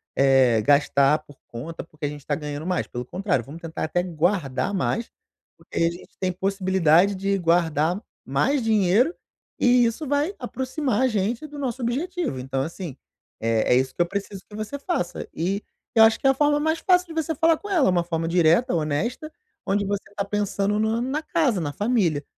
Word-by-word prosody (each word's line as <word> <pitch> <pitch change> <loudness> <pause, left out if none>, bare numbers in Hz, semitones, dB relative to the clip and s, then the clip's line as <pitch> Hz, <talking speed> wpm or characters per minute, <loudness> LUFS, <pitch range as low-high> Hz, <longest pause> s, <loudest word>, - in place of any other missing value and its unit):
eh, 130 -5 +4
gastar 140 +3 +3
por 145 - -15
conta 145 +8 -7
porque 155 -2 -8
a - - 0
gente 145 -1 -9
tá 145 - 0
ganhando 150 +1 -5
mais, 180 -1 0
pelo 120 - -5
contrário, 180 - -1
vamos 145 +8 -10
tentar 165 -1 -4
até 175 +3 0
guardar 175 -1 -1
mais, 225 +5 -1 0.5
porque - - -11
aí 165 - +3
a - - 0
gente 175 - -13
tem 185 -1 0
possibilidade 190 -1 +2
de 195 +1 0
guardar 165 0 +2 0.3
mais 245 - +1
dinheiro 220 - +3 0.4
e 245 -1 +5
isso 245 +7 -2
vai 290 +8 0
aproximar 260 -1 -2
a 260 - +4
gente 225 +5 -1
do 295 0 -10
nosso 260 -3 -3
objetivo 290 - -2
então 135 +1 -2
assim, 165 -1 -5 0.5
eh, 115 0 +1
é - - +5
isso 130 +1 +1
que - - 0
eu - - -6
preciso 195 0 -5
que 210 - -12
você 215 +6 -4
faça." 285 - -3
E 190 +5 -2 0.3
eu 225 - +8
acho 220 0 +5
que - - +1
a 270 - +6
forma 295 +1 +3
mais 315 +2 +1
fácil 360 +1 +3
de 330 - -9
você 320 - -2
falar 325 +2 +3
com 410 - -10
ela, 340 - +3
uma 175 -2 +2
forma 165 -1 -2
direta, 175 +8 +3
honesta, 170 - -2 0.3
onde 200 +1 +1
você 200 0 -2
tá 200 - -1
pensando 205 0 -1
no 220 +2 +1
na 265 +5 -2
casa, 290 - +1
na 145 -4 -3
família, 200 - +1
195 Hz, 195 wpm, -24 LUFS, 160-250 Hz, 0.5 s, eu